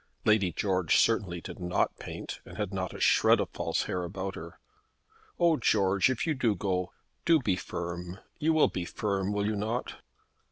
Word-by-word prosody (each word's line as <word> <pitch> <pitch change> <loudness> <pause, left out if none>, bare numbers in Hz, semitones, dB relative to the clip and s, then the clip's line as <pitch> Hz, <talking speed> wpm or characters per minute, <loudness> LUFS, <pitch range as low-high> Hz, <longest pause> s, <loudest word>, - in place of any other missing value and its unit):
Lady 105 -4 +4
George 95 -2 +1
certainly 95 -6 +2
did - - -8
not 90 -1 0
paint, - - -7
and - - -12
had 105 -3 -3
not 95 -1 -2
a - - -9
shred - - +5
of - - -2
false - - -1
hair 90 - -2
about 95 +2 -4
her. 85 0 -9 0.8
"Oh, 170 -2 +4
George, 100 -3 +3
if 130 +1 -1
you 160 - +1
do 120 -6 +1
go, 90 -1 -1 0.3
do 165 -1 +5
be 105 -9 +1
firm! 85 0 -5 0.2
You 160 +1 +2
will 155 - +5
be 90 - -4
firm; 100 +1 -2
will 105 0 0
you 110 +1 0
not?" 110 +4 -3
100 Hz, 185 wpm, -29 LUFS, 90-110 Hz, 0.8 s, shred